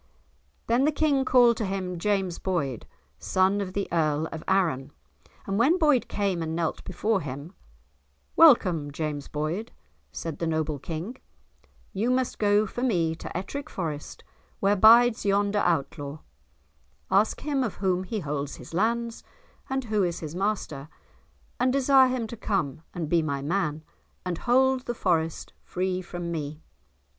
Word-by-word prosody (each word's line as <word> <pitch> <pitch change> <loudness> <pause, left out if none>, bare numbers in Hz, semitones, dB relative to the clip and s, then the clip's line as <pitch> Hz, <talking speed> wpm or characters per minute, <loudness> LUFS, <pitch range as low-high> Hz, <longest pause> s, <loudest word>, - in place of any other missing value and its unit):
Then 240 +4 +2
the 305 - +3
King 285 -3 +1
called 245 -3 +5
to 220 - -1
him 185 -2 -3
James 195 -2 0
Boyd, 145 - -2 0.3
son 185 - +2
of 185 -2 -5
the 200 0 -2
Earl 155 -2 +1
of 160 - -6
Arran, 165 -9 +1 0.6
and 195 +2 -1
when 290 +10 +4
Boyd 300 -7 +3
came 195 -4 -1
and 160 0 -3
knelt 165 -1 -2
before 215 -3 -1
him, 145 +5 -7 0.8
"Welcome, 185 - +5
James 145 -1 -4
Boyd," 160 +9 -3 0.4
said 165 -3 -6
the 165 - -1
noble 155 -2 -1
King; 170 - -5 0.8
"you 215 +5 0
must 255 0 0
go 205 0 +3
for 240 - -6
me 175 -10 +1
to 165 - -6
Ettrick 280 +11 -5
Forest 155 -5 -5 0.4
where 200 +1 +3
bides 230 +3 +6
yonder 200 +1 +2
Outlaw, 145 -4 -1 0.9
ask 205 +3 +2
him 285 -3 0
of 225 - -3
whom 185 -2 0
he 205 +3 -4
holds 145 -2 -3
his - - -12
lands, 230 +5 0 0.5
and 265 0 -1
who 215 -3 0
is 175 -2 -1
his 155 -2 -6
master, 180 -7 -2 0.7
and 250 +1 +3
desire 270 0 +5
him 250 -2 -1
to 225 - -7
come 190 - -2
and 170 -3 -4
be 170 +2 +3
my 140 -3 -2
man, 155 -2 -1 0.4
and 180 -2 -3
hold 260 +1 +3
the 240 - -2
Forest 165 -6 -1
free 185 0 -2
from 175 -1 -6
me. 155 -1 -5
190 Hz, 155 wpm, -26 LUFS, 160-230 Hz, 0.9 s, bides